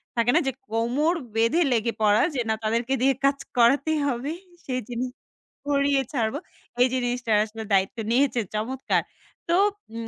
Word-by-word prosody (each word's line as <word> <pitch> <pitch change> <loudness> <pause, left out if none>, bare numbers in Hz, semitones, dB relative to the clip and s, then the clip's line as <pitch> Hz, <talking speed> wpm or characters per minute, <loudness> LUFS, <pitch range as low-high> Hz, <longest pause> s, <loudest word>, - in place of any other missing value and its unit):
থাকে 235 +1 +3
না - - +6
যে - - +2 0.2
কোমর 245 +9 +1 0.2
বেঁধে 230 +10 +3
লেগে 230 0 +1
পড়া। 210 0 +4
যে - - -1
না 220 - +2
তাদেরকে 230 +4 0
দিয়ে 270 +1 +4
কাজ 275 0 +3 0.2
করাতেই 280 +6 +3
হবে 265 +3 -2 0.3
সেই 255 -1 -2
জিনি 245 +1 -3 0.6
কড়িয়ে 280 -1 +2
ছাড়বো। 235 +3 -1 0.4
এই 255 - +7
জিনিসটা 245 -2 -1
আসলে 220 +1 -8
দায়িত্ব 195 +4 +2
নিয়েছে 255 -1 +2 0.2
চমৎকার। 250 +5 0 0.5
তো 340 - +4 0.4
উম 230 0 -5
245 Hz, 155 wpm, -25 LUFS, 230-275 Hz, 0.6 s, এই